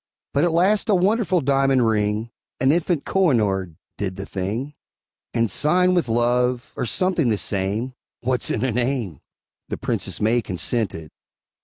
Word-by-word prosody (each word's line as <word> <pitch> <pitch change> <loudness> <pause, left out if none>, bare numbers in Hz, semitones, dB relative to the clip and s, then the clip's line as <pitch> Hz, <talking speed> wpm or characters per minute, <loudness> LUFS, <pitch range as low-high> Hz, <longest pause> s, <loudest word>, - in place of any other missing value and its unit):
But 140 - +2
at 175 - +2
last 190 +7 +2
a 205 - +5
wonderful 190 -1 +2
diamond 135 -2 +2
ring, 110 +1 0 0.3
An 130 +1 +4
infant 170 -1 0
Kohinoor, 105 - +1 0.2
did 95 -2 -2
the 95 0 -6
thing, 105 +11 -4 0.6
And, 115 -1 +1
sighing 180 - +3
with 175 -8 +1
love, 120 +1 +1
or 125 - -2
something 175 - +1
the 110 - +1
same, 100 +7 -2 0.3
(What's 125 0 0
in 115 - 0
a 130 - 0
name?) 120 - -2 0.5
The - - -3
Princess - - -3
May 115 +3 +2
consented. 90 -5 -2
125 Hz, 150 wpm, -22 LUFS, 105-155 Hz, 0.6 s, a